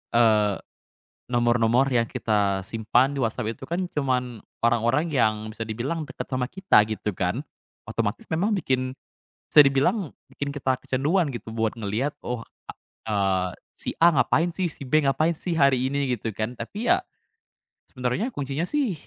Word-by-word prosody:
eee, 105 -3 +4 0.7
nomor-nomor 120 +1 +2
yang 120 -3 +2
kita 100 -4 0
simpan 120 +7 +1
di - - -2
WhatsApp 115 -1 -2
itu 130 - -9
kan, 170 +5 -2
cuman 125 - -2 0.2
orang-orang 120 +7 +2
yang 115 -7 +3 0.2
bisa 110 +1 -5
dibilang 135 +9 -3
dekat 130 - -7
sama 130 -1 0
kita, 160 - +3
gitu 110 -1 -3
kan. 90 +8 0 0.5
Otomatis 115 -1 -2
memang 195 +7 +1
bikin 130 -8 0 0.5
bisa 150 - +8
dibilang 140 +6 +2 0.2
bikin 140 0 -4
kita 135 -2 0
kecanduan 145 +5 0
gitu 115 -2 -7
buat 110 -1 +1
ngelihat, 115 +5 -2
oh, 120 -2 -3 0.6
eee, 95 -3 +1 0.3
"si - - -4
A 170 - +8
ngapain 165 +6 +3
sih? 180 +2 -2
Si 155 - -5
B 145 +2 +2
ngapain 155 +4 +2
sih 175 - -3
hari 140 -5 +3
ini?" 140 -1 -1
gitu 110 0 -4
kan. 110 +4 -4
Tapi 205 - -4
ya, 360 - +6 0.9
sebenarnya 125 - -1
kuncinya 145 - -3
sih, 280 -10 +1
130 Hz, 155 wpm, -25 LUFS, 115-150 Hz, 0.9 s, bisa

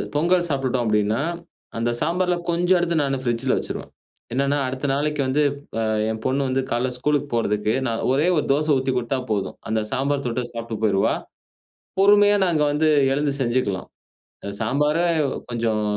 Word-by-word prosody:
பொங்கல் 175 +3 +2
சாப்பிட்டுட்டோம் 130 -3 0
அப்பிடின்னா, 105 +3 +1 0.6
அந்த 115 +1 0
சாம்பார்ல 180 +1 +1
கொஞ்சம் 175 +2 +3
எடுத்து 170 -1 0
நானு 135 -1 0
பிரிட்ஜ்ல 120 +2 +1
வச்சுருவேன். - - -5 0.4
என்னன்னா, 140 +2 +1
அடுத்த 130 +2 -4
நாளைக்கு 150 +1 0
வந்து, 145 +3 +1 0.4
அ - - 0 0.3
என் 110 0 -5
பொண்ணு 135 +2 +1
வந்து 130 +1 +1
கால்ல 120 +2 +1
ஸ்கூலுக்கு 145 +2 0
போறதுக்கு, 105 -2 0
நான் 115 -1 -2
ஒரே 150 +6 +2
ஒரு 150 - +1
தோச 155 +2 0
ஊத்திக் 130 -1 -1
குடுத்தா 125 +2 -1
போதும். 100 -2 -2
அந்தச் 110 -1 -1
சாம்பார் 140 +1 0
தொட்டு 120 +1 -2
சாப்ட்டுப் 115 -2 -5
போயிருவா! 100 -2 +2 0.9
பொறுமையா 205 +1 +6
நாங்க 165 -4 +1
வந்து, 155 +2 +2 0.2
எழுந்து 145 0 0
செஞ்சுக்கலாம். 120 -6 -1 0.6
அ - - -2
சாம்பார 150 +3 +1 0.5
கொஞ்சம் 115 -2 0
135 Hz, 155 wpm, -23 LUFS, 115-150 Hz, 0.9 s, பொறுமையா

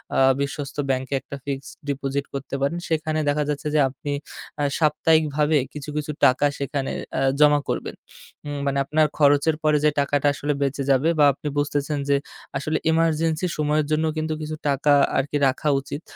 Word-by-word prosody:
আ - - +1 0.2
বিশ্বস্ত 140 0 -4
ব্যাংকে 130 +1 -1
একটা 140 - -8
ফিক্সড 140 -1 -5 0.2
ডিপোজিট 140 0 -2
করতে 140 0 -5
পারেন। 140 +5 0
সেখানে 155 -1 0
দেখা 150 +1 +1
যাচ্ছে 150 +1 -2
যে 150 - +4
আপনি 140 +2 -6 0.5
আ - - +1 0.2
সাপ্তাহিক 155 +1 +3
ভাবে 150 0 +3 0.2
কিছু, 150 0 -7
কিছু 150 0 -2
টাকা 130 +3 +4
সেখানে 140 -1 -2 0.3
আ - - 0 0.2
জমা 150 -1 +6
করবেন। - - -3 0.5
হুম 145 -1 -4
মানে, 140 0 +1
আপনার 155 +2 -2 0.2
খরচের 145 +2 +4
পরে 155 -1 +4
যে - - +6
টাকাটা 145 0 +1
আসলে 145 +1 -2
বেঁচে 140 0 -1
যাবে 135 +5 +3
বা 145 - +7
আপনি 150 - -8
বুঝতেছেন 145 0 -1
যে 140 - +4 0.4
আসলে 155 +3 -1
ইমারজেন্সি 165 +1 +1
সময়ের 150 0 +1
জন্য 155 +1 +2
কিন্তু 155 0 -1
কিছু 155 0 -4
টাকা 145 +1 +3 0.2
আরকি 145 +2 0
রাখা 135 +3 0
উচিত। 140 +2 -7
145 Hz, 175 wpm, -23 LUFS, 140-155 Hz, 0.5 s, বা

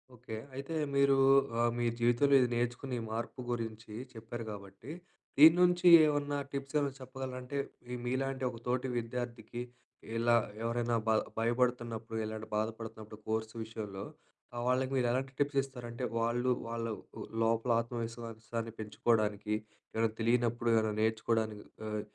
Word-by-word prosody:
Okay. 110 -1 -7 0.2
అయితే 140 +4 -4 0.2
మీరు 140 0 +5 0.5
ఆహ్, 120 - +3
మీ 120 - +1
జీవితంలో 120 +4 +4
ఇది 125 - +4
నేర్చుకుని 120 +2 -1
ఈ - - -4
మార్పు 115 +3 -4
గురించి 115 -2 -4 0.2
చెప్పారు 115 +1 -6
గాబట్టి, 100 +5 -9 0.5
దీన్నుంచి 175 +3 +7 0.2
ఏవన్నా 145 -1 0
టిప్స్ 140 +1 -5
ఏవనా 140 -1 0
చెప్పగలరా? 130 0 -6
అంటే, 125 +3 -5 0.3
మీ 125 - -4
మీలాంటి 130 +1 -1
ఒక 120 - -8
తోటి 125 +1 0
విద్యార్థికి, 120 0 -4 0.6
ఇలా 120 +1 +4 0.3
ఎవరైనా 120 0 0
బ 110 - +4 0.3
భయపడుతున్నప్పుడు 115 -1 0
ఇలాంటి 110 0 -5
బాధపడుతున్నప్పుడు 110 -1 -5
కోర్స్ 110 0 -1
విషయంలో, 105 -3 -6 0.5
ఆహ్, 120 0 -3
వాళ్ళకి 130 +1 +2
మీరెలాంటి 130 +2 0
టిప్స్ 145 -1 +2
ఇస్తారంటే, 125 -2 -7 0.2
వాళ్ళు 120 +2 +1 0.2
వాళ్ళవ్ 115 -1 -3 0.2
ఉ - - -4 0.2
లోపల 115 +2 +2
ఆత్మవిశ్వాసాన్ని 115 -1 -5
పెంచుకోడానికి, 105 -1 0 0.4
ఏవేనా 115 0 +3
తెలియనప్పుడు 120 0 +2
ఏవేనా 110 -1 +2
నేర్చుకోడానికి, 110 -1 0 0.2
ఆహ్, 105 -1 -2
120 Hz, 130 wpm, -33 LUFS, 110-130 Hz, 0.6 s, దీన్నుంచి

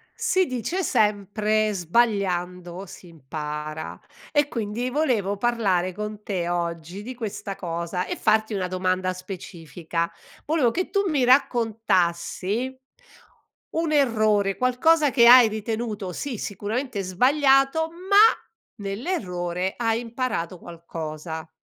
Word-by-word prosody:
Si 455 -5 +2
dice 255 - -2
sempre 215 - +1
"sbagliando 180 -2 0
si 180 - -13
impara" 150 0 -6 0.3
e 290 -1 +3
quindi 230 +1 -3
volevo 245 -9 0
parlare 200 -5 +1
con 210 +2 -6
te 180 -4 -2
oggi 170 +1 -3
di 250 +4 -7
questa 215 -4 -5
cosa 170 0 -3
e - - -3
farti 220 0 +2
una 190 -2 -1
domanda 185 0 0
specifica: 170 -2 -5 0.3
volevo 295 -6 +2
che 365 +7 -2
tu 400 -1 +1
mi 290 -6 +2
raccontassi 225 -2 +1 0.9
un 325 -1 -1
errore, 215 -8 +2
qualcosa 285 +5 +3
che 235 -3 +5
hai 250 -1 +10
ritenuto, 215 -2 -4
sì 245 +5 -4
sicuramente 210 +4 -3
sbagliato, 270 - +3
ma 370 +4 -1 0.7
nell'errore 190 - -2
hai 225 -1 0
imparato 230 -7 -3
qualcosa. 160 -1 -7
210 Hz, 110 wpm, -24 LUFS, 180-250 Hz, 0.9 s, hai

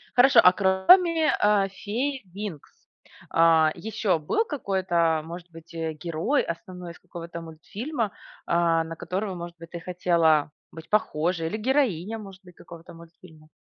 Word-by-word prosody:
Хорошо. 250 -1 +7
А 180 - +7
кроме, 310 - +4
а, 205 -1 +3
фей 245 +8 -3
"Винкс", 200 -7 -7 0.6
а, 165 -1 +4
ещё 210 -4 -1
был 160 - 0
какой-то, 185 - 0
может 170 +1 -9
быть, 165 0 -14
э, 160 -1 -2
герой 170 - -1
основной 180 0 -7
из - - -18
какого-то 170 0 -9
мультфильма, 210 - -5 0.3
а, 170 -1 +2
на 165 0 -7
которого, 190 +3 -4
может 170 0 -8
быть, 165 - -12
ты 170 - -7
хотела 170 -4 +2 0.2
быть 160 0 -12
похожей, 170 -4 0
или 190 - -3
героиня, 225 - 0
может 195 -3 -11
быть, 180 -1 -16
какого-то 170 0 -13
мультфильма? 165 -2 -16
180 Hz, 145 wpm, -25 LUFS, 165-210 Hz, 0.6 s, Хорошо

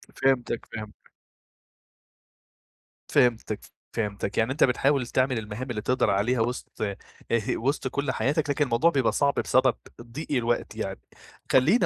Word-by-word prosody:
فهمتك، 125 -3 +1
فهمتك. 110 -2 -10 2.0
فهمتك، 115 -3 +2 0.3
فهمتك، 100 -2 -3
يعني 115 +3 +2
أنت 145 - +2
بتحاول 135 0 +2
تعمل 130 0 +1
المهام 110 +4 -6
اللي 110 -3 -2
تقدر 125 +3 +1
عليها 115 +5 +2
وسط 120 0 -3
آآ 100 -2 -1 0.6
وسط 135 +2 -1
كل 140 +1 -1
حياتك، 145 +3 0
لكن 145 +1 +2
الموضوع 130 +6 +3
بيبقى 135 -7 +2
صعب 140 -1 +2
بسبب 130 -1 +3 0.3
ضيق 120 +7 -7
الوقت 120 -3 0
يعني، - - -4 0.5
خليني 155 - +5
125 Hz, 130 wpm, -26 LUFS, 115-135 Hz, 2.0 s, خليني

